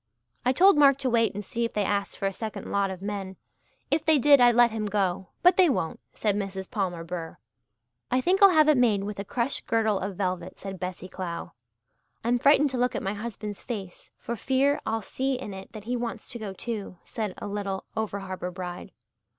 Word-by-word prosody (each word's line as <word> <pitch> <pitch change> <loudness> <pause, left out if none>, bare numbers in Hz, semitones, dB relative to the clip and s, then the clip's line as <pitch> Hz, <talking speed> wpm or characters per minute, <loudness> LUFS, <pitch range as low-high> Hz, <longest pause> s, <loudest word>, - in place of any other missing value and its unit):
"I 250 - +3
told 370 +6 +6
Mark 275 -2 +7
to 265 -2 -1
wait 230 -3 +2
and 205 0 -5
see 235 +4 -2
if 230 - -2
they 210 - +1
asked 200 0 -1
for - - -3
a 195 - 0
second 220 +2 -6
lot 200 -1 +1
of 190 0 -7
men. 200 -2 -4 0.6
If 310 - +2
they 315 -2 +4
did 285 0 +6
I'd 240 -1 +6
let 240 -1 +6
him 215 -1 -2
go 195 -2 0 0.2
but 360 +1 +6
they 365 -3 +6
won't," 165 - -1 0.2
said 210 -2 0
Mrs. 195 -2 -4
Palmer 180 -5 -2
Burr. 165 -1 -6 0.7
"I 255 - +2
think 365 +9 +2
I'll 395 - +10
have 310 -4 +5
it 300 -4 +5
made 215 -5 +3
with 205 0 -5
a - - -2
crush 240 +6 -2
girdle 220 -3 +1
of 195 0 -4
velvet," 185 -2 -2
said 195 -2 -7
Bessie 180 0 -5
Clow. 175 -2 -5 0.7
"I'm 240 +2 +2
frightened 285 +2 +5
to 255 - -2
look 250 0 +1
at - - -2
my 195 - -1
husband's 210 -1 -6
face 195 -7 -7
for 235 - -4
fear 270 +5 +1
I'll 225 0 -1
see 265 +6 -1
in 250 -6 -6
it 190 0 -9
that 215 - -8
he 245 +3 -2
wants 235 -1 -4
to 240 - -5
go 210 -3 -5
too," 205 -2 -5
said 215 -5 -4
a - - -6
little 200 -2 -3
over 210 -2 -2
harbour 185 -1 -5
bride. 180 +1 -7
210 Hz, 220 wpm, -27 LUFS, 195-250 Hz, 0.7 s, I'll